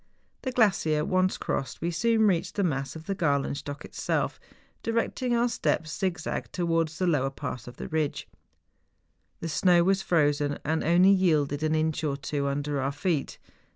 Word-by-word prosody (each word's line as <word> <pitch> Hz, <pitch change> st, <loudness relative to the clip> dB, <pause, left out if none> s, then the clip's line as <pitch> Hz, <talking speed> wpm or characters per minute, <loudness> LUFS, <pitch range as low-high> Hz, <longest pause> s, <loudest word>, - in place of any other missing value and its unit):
The 260 Hz, -, -3 dB
gla¬ 230 Hz, -4 st, +5 dB
cier 155 Hz, -3 st, 0 dB
once 185 Hz, 0 st, +1 dB
crossed, 130 Hz, -3 st, -3 dB
we 170 Hz, +1 st, -1 dB
soon 220 Hz, +6 st, +2 dB
reached 180 Hz, -5 st, +1 dB
the 200 Hz, -, +1 dB
mass 135 Hz, -5 st, -1 dB
of 160 Hz, 0 st, -9 dB
the 200 Hz, -, -1 dB
Galenstock 145 Hz, -3 st, -1 dB
itself, -, -, -2 dB, 0.4 s
directing 235 Hz, +2 st, 0 dB
our 235 Hz, +1 st, +3 dB
steps 160 Hz, -9 st, -1 dB
zigzag 185 Hz, -4 st, -3 dB
to¬ 175 Hz, -, -1 dB
wards 165 Hz, -2 st, 0 dB
the 185 Hz, -, 0 dB
lower 145 Hz, -6 st, +2 dB
part 125 Hz, -3 st, -6 dB
of 125 Hz, -, -10 dB
the -, -, -6 dB
ridge. 155 Hz, -2 st, -2 dB, 1.1 s
The 165 Hz, -, -3 dB
snow 175 Hz, +2 st, +4 dB
was 190 Hz, +1 st, +2 dB
frozen, 145 Hz, -4 st, +1 dB
and 160 Hz, +2 st, 0 dB
only 175 Hz, +4 st, +5 dB
yielded 155 Hz, -7 st, +2 dB
an 155 Hz, 0 st, +1 dB
inch 155 Hz, 0 st, 0 dB
or 140 Hz, -2 st, -1 dB
two 140 Hz, 0 st, -2 dB
under 140 Hz, 0 st, -1 dB
our 135 Hz, +1 st, 0 dB
feet. 145 Hz, +1 st, -2 dB
160 Hz, 175 wpm, -27 LUFS, 145-185 Hz, 1.1 s, gla¬